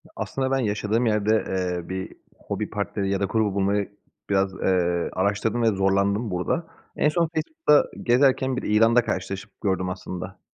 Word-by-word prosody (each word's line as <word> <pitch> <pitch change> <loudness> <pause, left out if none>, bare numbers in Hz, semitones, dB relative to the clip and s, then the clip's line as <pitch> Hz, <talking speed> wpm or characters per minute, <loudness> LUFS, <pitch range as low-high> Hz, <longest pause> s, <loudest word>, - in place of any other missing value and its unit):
Aslında 135 0 -2
ben 135 - +3
yaşadığım 110 +1 0
yerde, 105 0 +2
eee, 90 -2 -2
bir 95 0 -4 0.2
hobi - - -4
partneri 100 -1 -2
ya 100 0 0
da 100 - +1
grubu 105 -1 0
bulmayı 100 +1 0 0.4
biraz, 95 -1 +1
eee, 90 -2 +1
araştırdım 105 +5 0
ve - - +4
zorlandım 100 +3 +1
burada. 90 - -1 0.3
En 150 - +3
son 165 +1 +1
Facebook'ta 160 - +3 0.2
gezerken 130 +1 +3
bir - - -3
ilanda 115 +3 +4
karşılaşıp 95 +2 -5
gördüm 95 -3 0
aslında. 95 0 -6
100 Hz, 155 wpm, -24 LUFS, 95-120 Hz, 0.4 s, ve